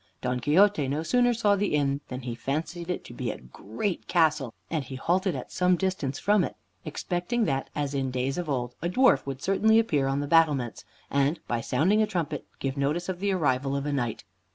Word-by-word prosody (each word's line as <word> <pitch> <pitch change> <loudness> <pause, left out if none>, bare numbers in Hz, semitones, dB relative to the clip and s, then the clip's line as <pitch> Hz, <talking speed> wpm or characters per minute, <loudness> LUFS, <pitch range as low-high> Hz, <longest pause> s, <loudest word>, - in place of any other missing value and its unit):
Don 125 0 -1
Quixote 160 +4 +4
no 145 +4 -1
sooner 245 +6 +3
saw 215 -3 +3
the 200 -5 0
inn 140 -1 +1
than 125 0 -6
he 120 -1 -4
fancied 155 +8 -4
it 180 - -2
to - - -10
be - - -3
a - - -4
great 110 - -5
castle, 155 -7 +2 0.2
and 155 -4 -2
he 130 +1 -8
halted 180 +7 0
at - - -7
some 180 0 +3
distance 175 -7 -2
from 205 +3 +3
it, - - -4 0.3
expecting 190 +7 -1
that, 135 -3 -1
as 145 -1 -2
in 135 -1 -1
days 130 +5 -1
of 170 -3 -4
old, 125 -3 -2
a 170 - -1
dwarf 245 - +4
would 135 -1 -5
certainly 220 +3 +4
appear 150 -12 +2
on 135 +1 0
the 145 - -1
battlements, 140 - +2 0.3
and, 140 +3 +2
by 120 -1 -1
sounding 195 - +2
a 215 - +2
trumpet, 175 -7 -3
give 135 0 -3
notice 150 +6 -1
of 180 -1 -3
the 200 +1 0
arrival 135 -6 +1
of 140 0 -2
a 145 - -1
knight. 120 -5 -2
150 Hz, 215 wpm, -27 LUFS, 135-185 Hz, 0.3 s, Quixote